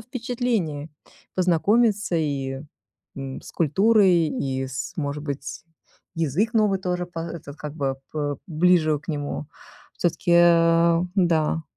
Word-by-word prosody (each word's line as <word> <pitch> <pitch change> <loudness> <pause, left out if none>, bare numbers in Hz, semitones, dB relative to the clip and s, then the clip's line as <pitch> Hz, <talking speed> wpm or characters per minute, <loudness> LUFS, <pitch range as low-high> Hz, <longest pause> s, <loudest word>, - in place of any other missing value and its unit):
впечатлений: 230 - -2 0.4
познакомиться 200 +3 +2
и, 135 -4 -2 0.6
м, 135 -1 -6
с - - -11
культурой, 185 0 +3
и 135 -2 -2
с 130 0 -5
может 145 -1 -3
быть, 140 +1 -5 0.5
язык 165 - 0
новый 210 -3 +3
тоже, 180 -1 -2
по 175 -2 -9
этот, 165 -3 -7
как 150 0 -7
бы, 135 -3 -2 0.2
п 145 -2 -2
ближе 160 -2 +3
к 155 - -23
нему. 145 -1 -3 0.5
Всё-таки, 175 0 -1
э, 170 -1 +5 0.2
да. 165 -3 +2
165 Hz, 120 wpm, -24 LUFS, 145-185 Hz, 0.6 s, э